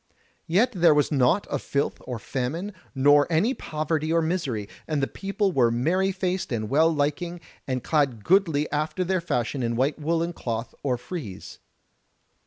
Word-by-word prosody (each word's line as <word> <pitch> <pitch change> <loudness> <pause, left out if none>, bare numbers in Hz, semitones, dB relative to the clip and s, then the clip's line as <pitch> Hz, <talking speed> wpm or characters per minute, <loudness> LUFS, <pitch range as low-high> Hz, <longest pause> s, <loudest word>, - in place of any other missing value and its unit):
Yet 215 +10 +3
was 160 -5 +4
there 150 - 0
naught 150 +11 +3
of - - -3
filth 140 0 -1
or 125 -2 -4
famine, 140 - -3 0.2
nor 145 +3 +5
any 200 +11 +3
poverty 155 - -2
or 165 - +4
misery; 145 - -2 0.2
and 155 -2 0
the 135 - +2
people 195 +5 -1
were 125 -7 +3
merry 170 +12 +1
faced 185 -2 -2
and 110 -2 -2
well 160 +4 +4
liking, 160 +4 -1 0.3
and 130 -2 -2
clad 135 -9 +1
goodly 165 -6 +3
after 155 +4 -1
their 185 0 0
fashion 130 -4 -1
in 115 -1 -1
white 135 +6 0
woollen 165 +3 0
cloth 115 -4 -4
or 130 -3 0
frieze. 125 - -7
155 Hz, 165 wpm, -25 LUFS, 130-175 Hz, 0.3 s, nor